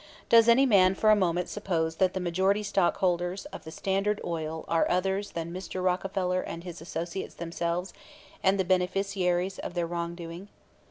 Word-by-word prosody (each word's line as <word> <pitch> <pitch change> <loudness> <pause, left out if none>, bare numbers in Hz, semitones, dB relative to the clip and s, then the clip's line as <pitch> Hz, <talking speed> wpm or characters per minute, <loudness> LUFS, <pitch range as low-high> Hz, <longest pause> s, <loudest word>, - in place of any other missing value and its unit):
Does 230 0 +7
any 255 +4 +6
man 190 -6 +5
for 215 +2 +4
a - - +7
moment 180 -3 +1
suppose 165 -6 -2
that 185 0 +2
the - - 0
majority 190 +4 +1
stockholders 180 -1 0
of - - -9
the - - -7
Standard 195 +4 -1
Oil 160 -1 -4
are 165 - +2
others 190 +3 0
than 165 0 -4
Mr. 185 0 -5
Rockefeller 185 0 0
and 165 - -7
his 175 -3 -8
associates 170 +2 -5
themselves 170 +2 -3 0.5
and 195 +1 +3
the 190 - +2
beneficiaries 185 0 0
of 175 - -6
their 175 -1 0
wrongdoing? 170 +1 -5
180 Hz, 165 wpm, -28 LUFS, 170-195 Hz, 0.5 s, Does